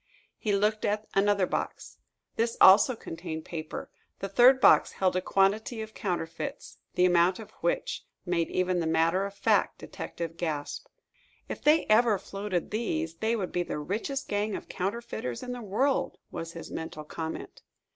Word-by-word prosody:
He 215 - -1
looked 210 +2 +1
at 210 +1 0
another 200 -1 +3
box. - - -4 0.4
This 230 0 0
also 210 +6 +8
contained 165 -5 -6
paper. 155 -2 -6 0.3
The 195 - -5
third 250 +6 +6
box - - +6
held 185 -1 +1
a 185 - +1
quantity 205 +5 +1
of 220 0 -10
counterfeits, 165 -5 -4 0.2
the 180 - +4
amount 175 +1 +4
of 220 - -10
which - - -1 0.2
made 175 -2 0
even 185 -1 +1
the 165 - -1
matter 165 +4 +2
of 200 - -11
fact - - +2
detective 165 -1 -6
gasp. 155 -4 -3 0.6
"If - - -6
they 305 +2 +4
ever 220 -1 +4
floated 195 -2 -4
these, 165 -7 -2
they 220 +5 0
would 195 -5 -3
be 180 - 0
the 175 - -3
richest 220 - -3
gang 205 0 -1
of - - -7
counterfeiters 190 - -4
in 250 - -5
the 245 -1 -5
world!" 245 +7 0
was 165 0 -6
his 165 - -8
mental 160 -1 -6
comment. 160 +1 -6
195 Hz, 165 wpm, -28 LUFS, 170-220 Hz, 0.6 s, also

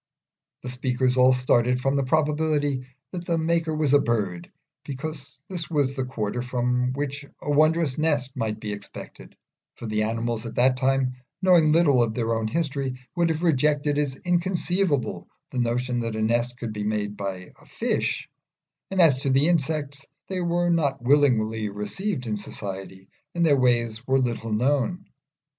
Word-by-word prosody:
The 125 - -5
speakers 125 0 0
all 130 0 +6
started 125 -1 +2
from 135 +2 0
the 140 - +2
probability 145 -2 +1 0.2
that 175 -2 -5
the 170 -1 0
maker 165 0 0
was 150 -3 +1
a 145 - +7
bird, 100 -9 -2 0.3
because 140 0 -7
this 175 -4 -5
was 145 -4 +1
the 130 -2 -2
quarter 120 -2 -3
from 125 0 0
which 140 +1 -3 0.2
a 145 - -3
wondrous 155 -1 +3
nest 145 -4 0
might 110 -4 -2
be 105 -1 -4
expected; 100 0 -10 0.4
for - - -9
the 110 -1 -1
animals 115 +1 -2
at 115 - -8
that 125 +1 +3
time, 130 -1 +1 0.2
knowing 175 -5 +5
little 150 -6 +4
of 110 -2 0
their 115 -1 0
own 110 -1 -1
history, 140 -2 -2 0.2
would 170 -1 +2
have 160 +1 -2
rejected 150 -1 +2
as 140 -3 -1
inconceivable 175 -3 0 0.2
the 125 - -3
notion 120 +1 0
that 115 -2 -3
a 110 - -2
nest 120 +2 0
could 115 -3 -5
be 105 -1 -4
made 105 -1 -2
by 95 -2 -5
a - - -19
fish; - - -1 0.6
and 190 - -2
as 155 -7 +6
to 140 - -1
the 135 +3 +4
insects, 145 -4 0 0.3
they 185 -1 -2
were 175 0 +1
not 140 -7 0
willingly 115 -6 +3
received 125 - -3
in 105 -2 -2
society 95 -2 -7 0.3
and 170 -1 +2
their 150 -3 +5
ways 120 -2 +1
were 135 0 +3
little 120 -3 -1
known. 140 - 0
130 Hz, 170 wpm, -25 LUFS, 115-155 Hz, 0.6 s, a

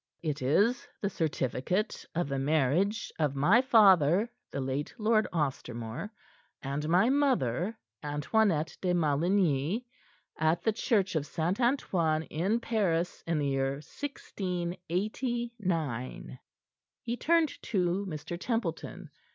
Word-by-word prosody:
"It 150 -4 -2
is 205 - +2
the 200 - -2
certificate 160 - -1
of 175 -2 0
the 135 -1 -2
marriage 155 - +1
of 145 -3 +1
my 180 - +5
father, 200 - +5 0.2
the - - -3
late 135 +2 -3
Lord 215 0 +2
Ostermore, 130 - -3 0.5
and 145 +3 -3
my 185 +9 +4
mother, 225 - +1 0.2
Antoinette 155 +3 +1
de 180 -1 +1
Maligny, 170 - +1 0.5
at 160 +2 +2
the 220 - +3
Church 205 -5 +1
of 150 -2 0
St. 175 +7 -1
Antoine 170 - +1
in 190 +9 +1
Paris, 185 -8 0
in 165 -1 +1
the 145 -2 0
year 135 0 0
1689." 180 - -3 0.6
He 235 0 -2
turned 330 +3 +1
to 185 -1 0
Mr. 160 +2 -5
Templeton. 230 +3 -3
175 Hz, 115 wpm, -30 LUFS, 145-215 Hz, 0.6 s, my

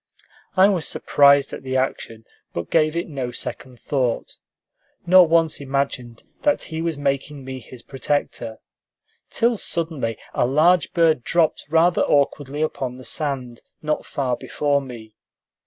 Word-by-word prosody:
I 190 +1 +7
was 185 -6 0
surprised 140 -1 +4
at - - -6
the 130 0 -2
action, 115 -4 -3 0.3
but 85 0 -5
gave 155 -1 +3
it 170 - -2
no 135 -5 -4
second 125 0 -6
thought, 130 -5 -2 0.7
nor 180 0 +7
once 165 -2 +2
imagined 130 -4 -3 0.2
that 290 -1 +1
he 160 -1 -5
was 165 -3 -2
making 140 0 -2
me 130 0 -6
his 125 -1 -13
protector, 135 -4 -3 0.7
till 235 0 +1
suddenly 160 - -3 0.2
a - - +1
large 160 +6 +3
bird 160 -7 +3
dropped 165 0 +1
rather 165 +2 +3
awkwardly 145 +1 +1
upon 130 -5 -3
the 130 - -11
sand, 130 -5 -3 0.2
not 150 0 -2
far 130 -3 -1
before 145 +3 -1
me. 115 -5 -10
140 Hz, 140 wpm, -22 LUFS, 130-160 Hz, 0.7 s, I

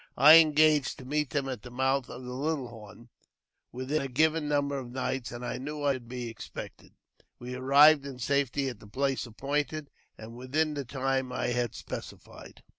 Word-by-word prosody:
I 150 +5 +10
engaged 155 -4 +3
meet 150 +1 -1
them 140 -2 -1
at 130 -5 -5
the 125 - -10
mouth 130 +1 0
of 125 - -8
the 125 0 -6
Little 140 -1 -2
Horn 110 0 -13 0.6
within 130 +5 -2
a 135 - -3
giv] 155 +5 +3
number 145 -1 0
of 125 -2 -8
nights, 130 -1 -3
and 120 +1 -7
I - - -4
knew 145 +2 -5
I 140 -1 +3
should 125 -3 -8
be 125 0 -5
expected, 115 -1 -9 0.5
arrived 140 +4 +4
in 135 -2 -8
safety 140 +2 0
at 120 -5 -6
the - - -14
place 135 +3 -1
appointed, 145 +5 -3 0.3
and 110 +1 -10
within 150 +5 -1
the 140 -2 -4
time 135 0 -1
had 120 -2 -2
specified. - - -9
135 Hz, 175 wpm, -29 LUFS, 125-145 Hz, 0.6 s, I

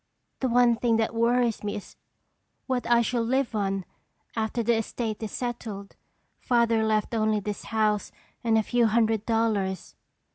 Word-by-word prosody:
The 260 - 0
one 240 -1 +4
thing 230 -1 +2
that 225 +1 0
worries 235 0 +1
me 205 - -2
is 205 - -9 0.7
what 255 -3 -2
I 235 0 +5
shall 240 +1 0
live 255 +2 0
on 195 -3 -1 0.5
after 225 +1 -1
the 235 +1 +3
estate 225 -1 -3
is 220 - -4
settled. 225 -5 -5 0.4
Father 235 -2 +2
left 215 +1 0
only 215 -1 +2
this 205 0 -5
house 215 -2 0 0.3
and 225 -1 +3
a 220 - +3
few 240 +1 +2
hundred 220 -1 +1
dollars." 215 -5 0
225 Hz, 155 wpm, -26 LUFS, 215-235 Hz, 0.7 s, I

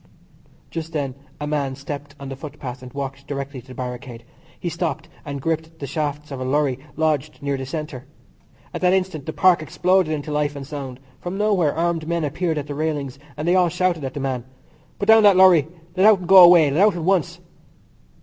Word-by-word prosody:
Just 165 0 -5
then 140 -4 -2 0.3
a 150 - -3
man 145 -3 -1
stepped 140 +1 -7
on 140 -1 -7
the 135 - -5
footpath 135 -3 -8
and 125 -1 -10
walked 140 0 -6
directly 140 -2 -5
to 130 - -24
the 130 - -11
barricade. 125 -1 -7 0.4
He - - -4
stopped 160 -2 -3 0.2
and 140 -1 -5
gripped 160 +2 -3
the 145 - -6
shafts 150 +1 -3
of 135 - -5
a - - -1
lorry 135 -1 0 0.2
lodged 155 -2 -1
near 140 -1 0
the 130 -1 -5
centre. 150 -3 -6 0.7
At - - -5
that 180 0 +4
instant 185 -7 -1
the - - -1
Park 180 0 +4
exploded 180 +2 +1
into 150 0 -3
life 150 0 0
and 140 -1 -6
sound; 135 -3 -7 0.2
from 180 +2 -5
nowhere 195 -8 +2
armed 165 -1 -1
men 170 -1 -1
appeared 160 +2 -1
at 145 - -3
the 145 - -6
railings, 145 -3 -3 0.2
and 150 +2 -3
they 175 - +4
all 180 -2 +4
shouted 180 -2 0
at 130 -1 -5
the - - -3
man. 130 -3 -2 0.5
"Put 200 - -2
down 220 +1 +7
that 200 -3 +6
lorry. 180 -6 +6 0.3
Let 190 +3 +5
out 215 -2 +7
and 180 -2 -8
go 195 - +7
away. 170 -4 +7
Let 155 +7 +2
out 205 -2 +5
at 170 - -4
once." 185 -3 +1
150 Hz, 215 wpm, -22 LUFS, 140-170 Hz, 0.7 s, down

